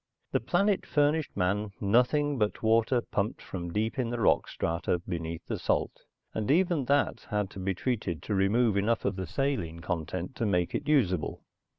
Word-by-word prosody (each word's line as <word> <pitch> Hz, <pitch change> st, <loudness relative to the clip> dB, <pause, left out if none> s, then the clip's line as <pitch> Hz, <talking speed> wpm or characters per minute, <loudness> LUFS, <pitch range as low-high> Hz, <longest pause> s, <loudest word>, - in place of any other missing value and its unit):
The -, -, +2 dB
planet 200 Hz, -1 st, +1 dB
furnished 150 Hz, -2 st, +1 dB
man 100 Hz, +2 st, 0 dB
nothing 125 Hz, +7 st, +2 dB
but 105 Hz, +1 st, -1 dB
water 115 Hz, +2 st, +3 dB
pumped 105 Hz, +1 st, -2 dB
from 85 Hz, -2 st, -6 dB
deep 110 Hz, +5 st, -1 dB
in 120 Hz, -2 st, 0 dB
the 120 Hz, 0 st, -3 dB
rock 110 Hz, -, +3 dB
strata 85 Hz, +2 st, -1 dB
beneath 85 Hz, -2 st, -5 dB
the -, -, -3 dB
salt, -, -, -1 dB, 0.3 s
and 110 Hz, -1 st, -2 dB
even 170 Hz, -2 st, +3 dB
that 140 Hz, +3 st, +1 dB
had 105 Hz, -2 st, -1 dB
to -, -, -8 dB
be 95 Hz, 0 st, -1 dB
treated 100 Hz, -7 st, -2 dB
to 105 Hz, -, -3 dB
remove 100 Hz, +3 st, +3 dB
enough 110 Hz, +3 st, +1 dB
of 100 Hz, -, 0 dB
the 95 Hz, -2 st, -4 dB
saline 105 Hz, -, -1 dB
content 90 Hz, +6 st, -3 dB
to 115 Hz, -, 0 dB
make 90 Hz, -3 st, +1 dB
it 145 Hz, -, -3 dB
usable. 95 Hz, -, +1 dB
105 Hz, 180 wpm, -29 LUFS, 95-130 Hz, 0.3 s, water